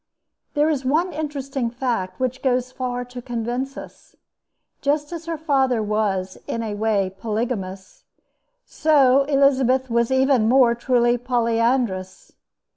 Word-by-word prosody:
There 295 +1 +3
is 295 -4 0
one 320 +8 +1
interesting 275 -5 -3
fact 230 -7 -3
which 260 0 -2
goes 255 -1 0
far 245 -1 -4
to 245 0 -9
convince 245 +3 -4
us. - - -12 0.7
Just 290 +2 0
as 335 -1 -7
her 330 -1 -2
father 265 -7 +1
was, 205 -3 -1
in 230 - -3
a 215 -2 -3
way, 205 -3 0
polygamous, 220 - -4 0.6
so 275 -3 +3
Elizabeth 265 -2 +2
was 235 0 +2
even 265 -4 +3
more 250 -2 +5
truly 240 0 +1
polyandrous. 230 -5 -1
250 Hz, 125 wpm, -22 LUFS, 230-275 Hz, 0.7 s, more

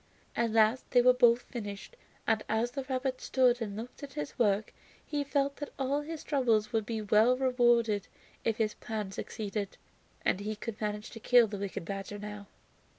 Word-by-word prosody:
At 235 -1 +1
last 225 +3 +3
they 245 - +5
were 250 0 +7
both 240 -1 +5
finished, 205 - -7 0.3
and 220 -1 +2
as 225 +3 +1
the 275 +2 -4
rabbit 260 0 -2
stood 250 -2 +3
and 205 -2 -4
looked 235 +3 -8
at 280 -2 -8
his 150 - -5
work 210 -2 +2 0.3
he 290 -1 -1
felt 280 0 0
that 290 - -5
all 275 +2 0
his 315 +1 -6
trouble 250 -7 +3
would 220 -2 0
be 225 -2 -2
well 215 +4 +4
rewarded 240 -5 +3 0.4
if 225 -1 0
his 215 -2 +1
plan 215 -4 -5
succeeded, 205 0 -4 0.5
and - - +2
he 215 +1 -3
could 220 0 -7
manage 210 0 -3
to 225 - -9
kill 245 +1 +6
the 205 -2 -5
wicked 195 -4 -4
badger 195 +2 -5
now. 205 -1 -7
225 Hz, 185 wpm, -31 LUFS, 210-255 Hz, 0.5 s, were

